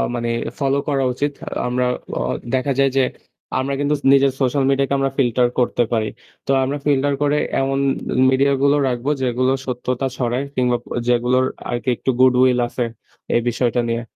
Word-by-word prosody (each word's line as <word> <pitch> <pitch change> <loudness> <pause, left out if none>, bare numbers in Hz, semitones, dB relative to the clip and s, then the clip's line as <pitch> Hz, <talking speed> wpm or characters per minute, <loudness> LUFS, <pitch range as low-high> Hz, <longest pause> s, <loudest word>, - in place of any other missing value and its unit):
মানে 120 0 -2 0.3
ফলো 140 0 +1
করা 135 -2 +1
উচিত। 145 +3 -1 0.4
আমরা 125 0 0 0.3
অ - - -1 0.3
দেখা 130 +2 +1
যায় 135 0 +4
যে 135 - +5 0.6
আমরা 135 +1 -2
কিন্তু 145 +1 +1 0.2
নিজের 135 0 +4
সোশ্যাল 135 +2 +2
মিডিয়া 135 0 +2
কে - - 0
আমরা 135 -1 0
ফিল্টার 125 -2 +2
করতে 120 0 +2
পারি। 110 -2 0 0.4
তো - - 0
আমরা 140 +3 -2
ফিল্টার 145 0 +2
করে 145 0 +2 0.2
এমন 135 0 0 0.5
মিডিয়া 140 +1 +3
গুলো 140 +1 +4
রাখবো 125 +2 -2
যেগুলো 130 +1 +1
সত্যতা 125 +1 -2
ছড়ায় 125 +2 -1
কিংবা 125 -1 +2 0.3
যেগুলোর 125 +1 +2 0.2
আরকি 120 +1 -2
একটু 130 - -4
গুড 130 0 +6
উইল 125 -1 +4
আছে 120 0 -2 0.5
এই 120 - +3
বিষয়টা 120 0 0
নিয়ে। 115 0 -1
130 Hz, 170 wpm, -20 LUFS, 125-140 Hz, 0.6 s, গুড